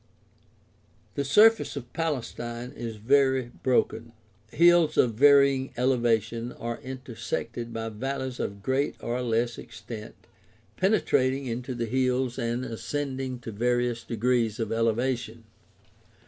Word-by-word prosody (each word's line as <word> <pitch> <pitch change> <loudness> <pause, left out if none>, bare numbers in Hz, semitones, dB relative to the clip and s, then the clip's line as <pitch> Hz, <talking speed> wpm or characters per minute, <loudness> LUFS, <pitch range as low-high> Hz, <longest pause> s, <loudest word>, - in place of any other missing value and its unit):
— - - -35
The 140 - -1
surface 215 +11 +5
of 125 -4 -8
Palestine 125 -6 -3
is 115 -2 -5
very 130 +2 +2
broken. 115 -2 0 0.4
Hills 170 +2 +4
of 120 -3 +4
varying 140 +1 +5
elevation 120 -2 +1
are 115 0 -5
intersected 120 -2 -5
by 115 -1 -4
valleys 130 +3 -4
of 100 0 -4
greater 135 +4 0
or 120 +2 -1
less 120 0 0
extent 110 -3 -9 0.6
penetrating 140 -9 +2
into 125 +1 -4
the 120 -1 -2
hills 130 +1 0
and 120 +1 -2
ascending 130 +1 -4
to 115 - -6
various 120 +2 0
degrees 115 -1 0
of 110 -2 -2
elevation. 115 0 -1
125 Hz, 120 wpm, -27 LUFS, 115-130 Hz, 0.6 s, surface